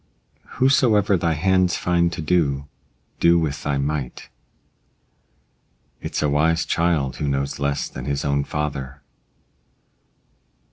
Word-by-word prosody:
Whosoever 120 -7 +3
thy 85 -2 +1
hands 90 +2 +2
find 85 -1 +1
to 85 -2 -5
do, 75 -4 +1 0.5
do 85 0 +5
with 75 -4 -1
thy 70 -1 -1
might. 70 -2 -3 1.7
It's - - -3
a - - +3
wise 80 +3 +2
child 80 -6 0
who 75 - -2
knows 70 0 -2
less 70 0 -1
than 65 - -8
his 70 0 -2
own 70 0 +1
father. 70 -2 -4
75 Hz, 120 wpm, -22 LUFS, 70-85 Hz, 1.7 s, do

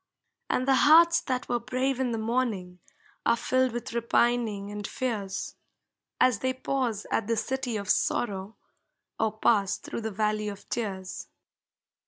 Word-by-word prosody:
And 255 - 0
the 270 - +5 0.2
hearts 335 +2 +7
that 255 -2 -2
were 240 0 0
brave 255 +2 -1
in 260 -2 +1
the 225 - -1
morning 220 -6 -1 0.4
Are 235 - +4
filled 255 +1 +1
with 240 0 -5
repining 235 -3 +1
and 205 -1 -5
fears, 205 -7 -3 0.7
As 250 -5 +4
they 260 0 -1
pause 255 -5 -2
at 215 - 0
the 230 0 +1
City 265 -3 -2
of 200 -1 -5
Sorrow 200 -1 0 0.6
Or 220 -1 0
pass 205 -3 +2
through - - -6
the 220 - -2
Valley 215 0 -1
of 200 -1 -7
Tears. 195 -5 -4
230 Hz, 150 wpm, -28 LUFS, 205-255 Hz, 0.7 s, hearts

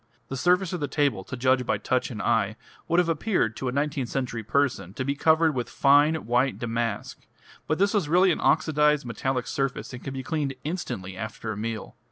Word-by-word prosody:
The 135 - -3
surface 180 +5 +2
of 180 - -2
the 145 - -1
table, 140 -11 0
to 130 - -6
judge 130 +1 +3
by 125 - 0
touch 130 -1 -1
and 110 -4 -5
eye, 110 -3 +1 0.3
would 170 - +1
have 180 -1 +4
appeared 165 - 0
to 130 - -3
a - - 0
nineteenth 140 -2 -1
century 125 -4 -2
person 115 -5 0
to 130 - -3
be 140 - 0
covered 160 +2 +3
with 125 -3 -3
fine 145 +3 +4
white 125 +3 +1
damask, 115 -2 -3 0.5
but 155 - +1
this 200 +2 +2
was 195 -9 +1
really 180 +3 +5
an - - -1
oxidised 150 -3 +3
metallic 125 +1 -2
surface, 135 -1 -3
and 125 - -8
could 135 - -5
be 135 -1 -5
cleaned 145 -4 -2
instantly 100 - -4
after 110 0 -5
a - - -4
meal. 110 +1 -5
135 Hz, 210 wpm, -26 LUFS, 120-155 Hz, 0.5 s, really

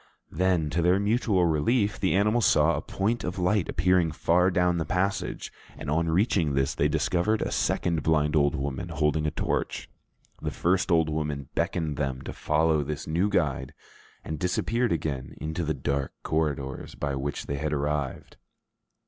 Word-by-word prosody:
Then, 90 -5 +1
to 85 - 0
their 90 +3 +3
mutual 105 -3 +2
relief, 100 - +1
the 95 -2 +1
animals 105 +2 +3
saw 75 +2 +4
a 75 - -2
point 110 +8 -1
of 90 +2 -4
light 90 +1 +1
appearing 90 -1 +2
far 90 +3 +2
down 90 -1 +2
the - - 0
passage, 95 +4 -2 0.2
and - - -5
on 80 +2 +1
reaching 85 - +2
this, 70 0 +1
they - - +2
discovered 105 +5 +1
a - - -3
second 85 -3 0
blind 75 0 +2
old 70 0 +3
woman 70 +2 -3
holding 75 0 0
a - - +2
torch. - - -3 0.5
The - - -2
first 90 +2 0
old 80 -2 +4
woman 75 -3 -3
beckoned 80 -4 -1
them 65 -3 -2
to - - -6
follow 80 0 +1
this 75 +1 -5
new 85 +6 +1
guide, 70 -9 -1 0.5
and 80 -1 -4
disappeared 115 +7 0
again 75 -5 -3
into 80 +3 -3
the 80 -1 -1
dark 70 0 -2
corridors 70 -4 -2
by 70 -1 -2
which 70 +2 -3
they 70 - -3
had 75 +1 -2
arrived. 75 -2 -2
80 Hz, 170 wpm, -27 LUFS, 75-90 Hz, 0.5 s, saw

